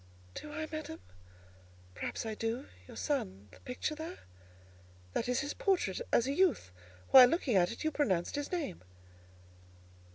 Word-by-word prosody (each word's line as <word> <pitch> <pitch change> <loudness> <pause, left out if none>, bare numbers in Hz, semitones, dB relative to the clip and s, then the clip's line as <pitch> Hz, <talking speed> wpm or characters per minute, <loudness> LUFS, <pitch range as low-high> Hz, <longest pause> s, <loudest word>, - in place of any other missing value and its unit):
"Do, 300 - -7
I, 310 +1 -4
madam? 310 - -5 0.9
Perhaps 95 - -4
I 220 - -2
do. 225 +4 -2 0.2
Your - - -11
son—the 95 +1 -3
picture 250 +4 -3
there?" 320 +3 -6 1.0
"That 240 - -1
is 250 - +2
his 285 - -3
portrait 355 - +1
as 235 - +4
a 275 - 0
youth. 290 - +2 0.4
While 255 -1 +11
looking 270 - +1
at 180 -1 +4
it, 230 - -6
you 315 - +1
pronounced 190 - 0
his 290 0 -3
name." 320 - -3
250 Hz, 150 wpm, -33 LUFS, 190-310 Hz, 1.0 s, While